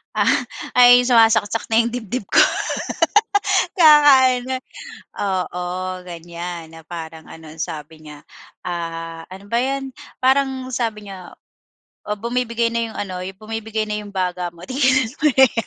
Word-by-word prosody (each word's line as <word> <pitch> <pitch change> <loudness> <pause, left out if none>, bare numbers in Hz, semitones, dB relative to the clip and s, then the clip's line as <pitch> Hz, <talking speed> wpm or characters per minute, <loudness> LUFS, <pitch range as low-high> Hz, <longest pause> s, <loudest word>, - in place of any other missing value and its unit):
Ah, - - +2 0.5
ay 245 0 +8
sumasaksak 225 -2 +3
na 225 - +6
yung 235 - -2
dibdib 245 0 -4
ko. - - +1 1.4
Kakaano, 260 -5 +5 0.6
oo, 180 -2 -2 0.4
ganyan 170 -1 -7
na 160 - -12
parang 160 -2 -8
ano 160 -1 -12
ansabi 155 0 -7
niya, 150 -1 -13 0.4
ah, 165 -1 -5
ano 190 +2 -11
ba 235 - +1
yan, 270 0 -3 0.3
parang 265 0 +2
sabi 215 -4 -3
niya 185 -2 -10 0.7
o 210 - -1
bumibigay 235 +1 -1
na 235 - 0
yung - - -11
ano 190 -3 -4 0.2
bumibigay 220 0 -4
na 210 - -2
yung 205 -1 -10
baga 180 -1 -2
mo 170 - -15
tigilan 260 -3 +2
mo - - +4
na 265 0 +4
yan. 230 -1 -4
215 Hz, 140 wpm, -20 LUFS, 175-250 Hz, 1.4 s, ay